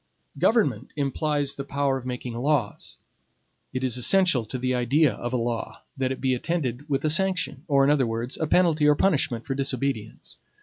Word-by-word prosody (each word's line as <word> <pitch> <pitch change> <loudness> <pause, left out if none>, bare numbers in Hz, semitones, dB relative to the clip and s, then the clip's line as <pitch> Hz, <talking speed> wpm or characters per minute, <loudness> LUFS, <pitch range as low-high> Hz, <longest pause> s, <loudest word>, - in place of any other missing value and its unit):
Government 140 - +1
implies 145 0 -1
the 140 - -6
power 140 0 0
of 130 -1 -6
making 125 -1 -5
laws. 125 -3 -1 0.7
It 130 0 -3
is 125 -1 0
essential 140 -1 +3
to 130 - -5
the 130 0 -1
idea 135 +4 +2
of 120 - -5
a 130 - 0
law, 115 -1 -4
that 130 -1 -1
it 135 - -4
be 130 -1 +1
attended 145 -1 -3
with 135 +1 0
a - - +3
sanction; 180 -5 -1
or, 140 -3 +4
in 140 - +4
other 135 -5 +2
words, 115 +3 -3
a 160 - +1
penalty 160 -3 +3
or 150 - +5
punishment 140 -10 +1
for 135 - -2
disobedience. 135 -4 -3
135 Hz, 185 wpm, -25 LUFS, 125-150 Hz, 0.7 s, or